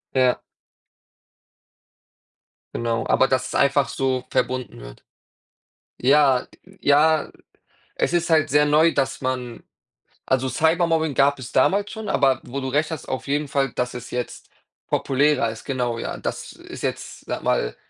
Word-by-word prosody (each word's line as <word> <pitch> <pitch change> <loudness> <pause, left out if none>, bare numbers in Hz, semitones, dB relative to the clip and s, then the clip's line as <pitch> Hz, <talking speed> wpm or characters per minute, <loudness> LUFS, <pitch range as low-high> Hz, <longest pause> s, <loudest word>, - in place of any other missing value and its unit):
Ja. 130 -1 +3 2.3
Genau, 115 -1 -1
aber 130 - +3
dass 130 -1 0
es - - -7
einfach 140 0 +3
so 130 -1 -1
verbunden 130 - -2
wird. - - -12 1.0
Ja, 135 -1 +4 0.2
g 195 +1 -20
ja, 150 +2 +3 0.7
es - - 0
ist 170 0 +1
halt 155 -2 +3
sehr 150 +1 +4
neu, 155 +3 +4
dass 135 -1 -1
man 125 -2 -4 0.7
also, 130 0 +1
Cybermobbing 160 -1 +1
gab 140 +1 +3
es 125 -3 -9
damals 200 +9 +2
schon, 220 -1 -6
aber 135 -2 +2
wo 135 +3 -5
du 130 - -4
recht 150 +4 0
hast 160 -3 -6
auf 130 -3 -4
jeden 145 +1 0
Fall, 135 -2 0
dass 125 0 -2
es 125 0 -8
jetzt 125 -1 -5 0.4
populärer 140 -2 +2
ist, 110 - -9
genau, 125 -3 -2
ja. - - -5
Das - - -5
ist - - -11
jetzt, - - -5
sage - - -4
mal, - - 0
135 Hz, 150 wpm, -23 LUFS, 125-150 Hz, 2.3 s, Ja